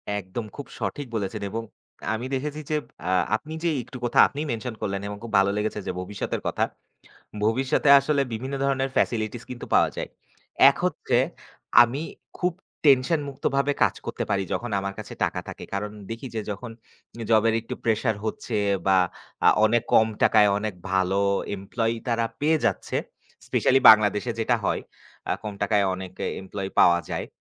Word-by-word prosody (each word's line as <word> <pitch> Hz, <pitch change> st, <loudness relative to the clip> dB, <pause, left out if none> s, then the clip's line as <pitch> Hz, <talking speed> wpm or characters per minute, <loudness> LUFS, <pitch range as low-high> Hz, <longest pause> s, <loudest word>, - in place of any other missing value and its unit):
একদম 105 Hz, +2 st, -4 dB
খুব 145 Hz, -, -7 dB
সঠিক 145 Hz, -2 st, -3 dB
বলেছেন, 105 Hz, 0 st, -3 dB
এবং 115 Hz, +3 st, -4 dB
আ -, -, -18 dB
আমি 115 Hz, +3 st, -5 dB
দেখেছি 150 Hz, +3 st, -3 dB
যে, 155 Hz, -, +1 dB, 0.3 s
আহ 90 Hz, -1 st, +3 dB
আপনি 155 Hz, +8 st, -6 dB
যে 170 Hz, -, +2 dB
একটু 130 Hz, +2 st, -10 dB
কথা 120 Hz, -, +1 dB
আপনি 140 Hz, -, -8 dB
মেনশন 115 Hz, +1 st, -4 dB
করলেন, 100 Hz, -1 st, -2 dB
এবং 105 Hz, 0 st, -6 dB
খুব 115 Hz, -, -7 dB
ভালো 100 Hz, 0 st, +3 dB
লেগেছে 105 Hz, 0 st, -1 dB
যে -, -, 0 dB
ভবিষ্যতের 100 Hz, +2 st, -4 dB
কথা। -, -, 0 dB, 0.8 s
ভবিষ্যতে 130 Hz, +6 st, +1 dB
আসলে 140 Hz, +1 st, +1 dB
বিভিন্ন 130 Hz, +5 st, -4 dB
ধরনের 135 Hz, -1 st, 0 dB
ফেসিলিটিস 110 Hz, 0 st, 0 dB
কিন্তু 125 Hz, -2 st, -7 dB
পাওয়া -, -, +5 dB
যায়। -, -, -4 dB, 0.6 s
এক -, -, -5 dB
হচ্ছে, -, -, 0 dB, 0.7 s
আমি 125 Hz, +5 st, -1 dB, 0.4 s
খুব 180 Hz, 0 st, +1 dB, 0.3 s
টেনশনমুক্তভাবে 140 Hz, 0 st, +2 dB
কাজ -, -, +3 dB
করতে -, -, -3 dB
পারি, 100 Hz, -1 st, +1 dB
যখন 120 Hz, -, -2 dB
আমার 100 Hz, 0 st, -4 dB
কাছে 110 Hz, -, -7 dB
টাকা -, -, -2 dB
থাকে। -, -, -8 dB
কারণ 105 Hz, +1 st, -2 dB, 0.2 s
দেখি 115 Hz, +4 st, -5 dB
যে, 110 Hz, -, -1 dB
যখন 110 Hz, +4 st, -6 dB, 0.5 s
এ -, -, -4 dB
জবের 110 Hz, 0 st, +4 dB
একটু 115 Hz, -, -6 dB
প্রেশার 110 Hz, 0 st, +1 dB
হচ্ছে 110 Hz, +1 st, -3 dB, 0.3 s
বা 95 Hz, -1 st, +5 dB, 0.5 s
আ -, -, +9 dB, 0.2 s
অনেক 115 Hz, +1 st, +3 dB
কম 110 Hz, -, +6 dB, 0.2 s
টাকায় 105 Hz, -2 st, +6 dB
অনেক 105 Hz, -1 st, -3 dB, 0.2 s
ভালো 95 Hz, +1 st, +2 dB, 0.4 s
এমপ্লয়ি 115 Hz, +4 st, -2 dB
তারা 115 Hz, -1 st, +1 dB, 0.2 s
পেয়ে 155 Hz, +2 st, +3 dB
যাচ্ছে, -, -, 0 dB, 0.5 s
স্পেশালি 135 Hz, +1 st, +3 dB
বাংলাদেশে 105 Hz, +1 st, +4 dB
যেটা 120 Hz, +2 st, +2 dB
হয়। -, -, 0 dB, 0.5 s
আ -, -, +3 dB
কম 105 Hz, -2 st, -5 dB
টাকায় 100 Hz, 0 st, +2 dB
অনেক 95 Hz, -1 st, -7 dB
এ -, -, 0 dB
এমপ্লয়ি 95 Hz, 0 st, -5 dB
পাওয়া 85 Hz, 0 st, +6 dB
যায়। -, -, -3 dB
115 Hz, 170 wpm, -25 LUFS, 105-130 Hz, 0.8 s, আ